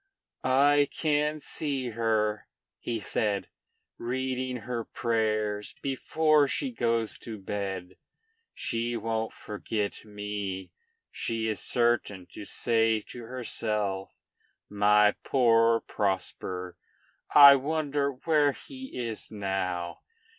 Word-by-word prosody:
"I 140 +2 +4
can 150 0 0
see 140 -5 -2
her," 110 -2 0 0.3
he 115 -2 -3
said, 105 -1 -1 0.5
"reading 130 +1 -2
her 120 -2 -3
prayers 110 -3 -1
before 150 +2 +3
she 265 - -1
goes 115 - -1
to 110 -2 -7
bed. 95 -2 -4 0.6
She 115 +1 -1
won't 110 0 -2
forget 105 0 -4
me; 105 -2 -5 0.4
she 115 -1 -2
is 110 -2 -1
certain 120 -6 +1
to 105 - -8
say 115 0 +1
to 120 -2 -8
herself, 105 -5 -3 0.5
'My 105 0 +5
poor 115 -3 +4
Prosper; 95 -2 -3 0.6
I 140 -1 +11
wonder 145 0 0
where 145 +1 +2
he 265 - -10
is 115 -3 -4
now!' 95 -4 -3
115 Hz, 100 wpm, -28 LUFS, 105-130 Hz, 0.6 s, I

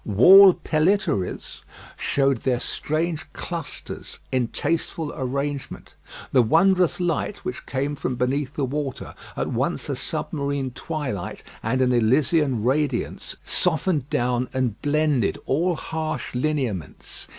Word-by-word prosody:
Wall 185 - +8
pellitories 155 - 0 0.3
showed 140 -2 +1
their 125 +1 0
strange 155 +2 -2
clusters 170 -3 -6
in 125 -2 +1
tasteful 160 +3 -2
arrangement. 140 +2 -4 0.4
The 130 - +5
wondrous 185 - +3
light 175 +3 -2
which 125 - -5
came 140 +2 -1
from 130 -2 -2
beneath 130 +3 -1
the 140 - 0
water, 140 0 -4 0.2
at - - -1
once - - -1
a - - 0
submarine 140 -2 -2
twilight 130 - -4 0.2
and 130 +4 +1
an 125 - +2
Elysian 130 +1 +2
radiance, 135 0 -1
softened 160 -5 +1
down 125 +1 0
and 125 -5 -1
blended 145 -6 +1
all 170 +6 +1
harsh 160 0 -4
lineaments. 125 - -3
140 Hz, 115 wpm, -24 LUFS, 125-155 Hz, 0.4 s, Wall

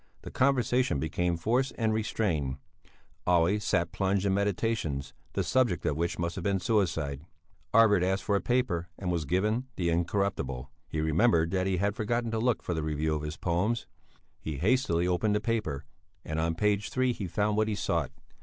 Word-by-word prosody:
The - - -8
conversation 125 - +2
became 85 +3 0
forced 125 +9 +1
and 110 -2 +1
restrained. 95 -11 -1 0.7
Olle 90 +3 +3
sat 85 -4 0
plunged 95 +1 0
in 100 - +2
meditations, 100 -8 -1 0.2
the - - 0
subject 120 -10 +1
of 75 - +1
which 85 +2 -1
must 85 0 -2
have 95 - -6
been 100 0 +1
suicide. 85 - 0 0.5
Arvid 110 -4 +5
asked 95 +2 0
for 100 - +1
a 100 - +1
paper 105 -9 0
and 90 -2 -2
was 85 -3 -1
given 105 - 0
the 85 -2 0
Incorruptible. 85 -7 -1 0.2
He 80 - -2
remembered 80 +1 +3
that 95 -1 0
he 95 -1 +1
had 100 +2 0
forgotten 115 +2 -1
to 110 - -1
look 120 0 +1
for 90 - -2
the 80 - -1
review 75 0 -1
of 75 - -2
his 75 +1 -5
poems. 100 +7 0 0.5
He 80 -3 -5
hastily 90 - +2
opened 105 +4 +1
the - - +2
paper 105 -10 -2 0.4
and 80 0 -2
on 80 0 0
page 105 +2 +1
three 130 -1 +1
he 100 -5 -5
found 105 +4 0
what 110 0 +2
he 110 - -1
sought. - - -1
95 Hz, 185 wpm, -29 LUFS, 85-110 Hz, 0.7 s, Arvid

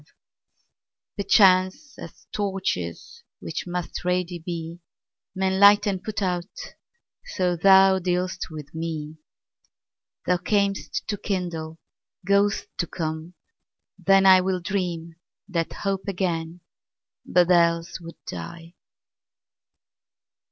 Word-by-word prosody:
Perchance, 200 +6 +3
as - - -11
torches, 190 - -3 0.2
which 160 +2 -5
must 175 -1 -4
ready 180 -1 -1
be, 170 0 -6 0.6
Men 190 0 0
light 205 +1 +7
and 190 -3 -2
put 210 -2 -3
out, 180 0 -2 0.7
so 185 - -1
thou 190 +1 +6
dealst 180 +1 -2
with 150 -3 -9
me. 160 -1 -5 1.1
Thou 180 - +2
cam'st 180 -6 -1
to 205 - -2
kindle, 170 -5 -4 0.5
goest 200 +1 +2
to 170 - 0
come: 160 +1 -5 0.6
then 195 0 +4
IWill 185 -1 +5
dream 170 -3 -3 0.3
that 170 -5 -2
hope 195 -1 -3
again, 175 -3 -2 0.6
but 180 0 +3
else 170 0 +2
would 170 0 -10
die. 170 0 -8
180 Hz, 100 wpm, -24 LUFS, 165-195 Hz, 1.1 s, light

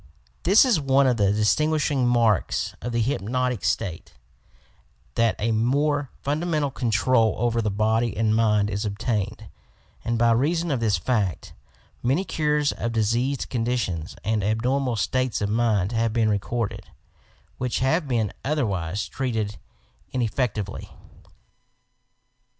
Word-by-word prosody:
This 200 +8 +6
is 235 -10 +3
one 135 0 +3
of 125 -2 +2
the 100 -2 +3
distinguishing 140 +5 +1
marks 115 -4 +1
of 120 - -4
the 115 -1 +1
hyp 130 -4 -1
notic 125 0 -1
state 100 -5 -2 0.5
— 60 0 -36
that 115 -1 +2
a 115 +2 0
more 140 +5 +1
fundamental 150 0 0
control 115 -1 +2
over 115 0 +1
the 110 - 0
body 110 +3 0
and 110 0 +2
mind 105 -2 +2
is 100 +2 -2
obtained, 110 0 -2 0.6
and, 115 0 -1
by 115 0 +4
reason 160 +8 +1
of 135 - 0
this 110 -4 +1
fact, 100 - -1 0.5
many 135 +10 +1
cures 150 -4 0
of 115 0 -4
diseased 120 +5 0
conditions 115 -9 -2
and 105 0 0
abnormal 125 +4 0
states 130 +3 0
of 100 - -1
mind 110 -3 +1
have 115 -1 0
been 115 -1 +2
recorded, 105 +2 -3 0.3
— - - -34
which 125 -1 -1
have 150 +5 +1
been 115 -5 0
other 150 -1 0
wise 95 -1 -2
treated 110 -6 -3 0.5
ineffeatually. 110 -4 -2
115 Hz, 140 wpm, -24 LUFS, 105-130 Hz, 0.6 s, This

